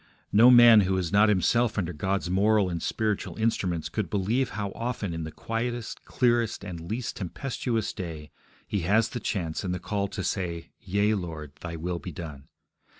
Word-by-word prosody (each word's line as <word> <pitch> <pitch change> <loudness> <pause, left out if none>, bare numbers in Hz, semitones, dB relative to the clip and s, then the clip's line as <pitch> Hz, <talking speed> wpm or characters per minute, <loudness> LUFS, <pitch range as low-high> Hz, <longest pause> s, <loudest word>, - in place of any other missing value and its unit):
No 115 +4 +7
man 120 -3 +9
who 95 0 +1
is 90 -3 -2
not 105 +2 +5
himself 110 +4 +2
under 90 -3 -1
God's 95 +4 -1
moral 100 +1 +3
and 85 -1 -3
spiritual 110 +2 -2
instruments 95 -7 0
could - - -3
believe 110 +7 0
how 100 0 -4
often 115 -6 -3
in 80 -1 -4
the 80 - -6
quietest, 115 +4 -4
clearest, 120 -4 +1
and 85 -4 -6
least 120 +2 -3
tempestuous 115 +2 -3
day 80 -6 -7 0.4
he 100 - -1
has 105 +6 +2
the 120 - -4
chance 85 -7 -2
and 90 -2 -2
the - - -4
call 100 +2 -2
to 95 - -5
say, 85 -4 -3
Yea, 100 +2 +1
Lord, 80 -7 -5
Thy 85 -1 -6
will 85 +2 -3
be 90 - -7
done. 75 -4 -8
100 Hz, 180 wpm, -27 LUFS, 85-110 Hz, 0.4 s, man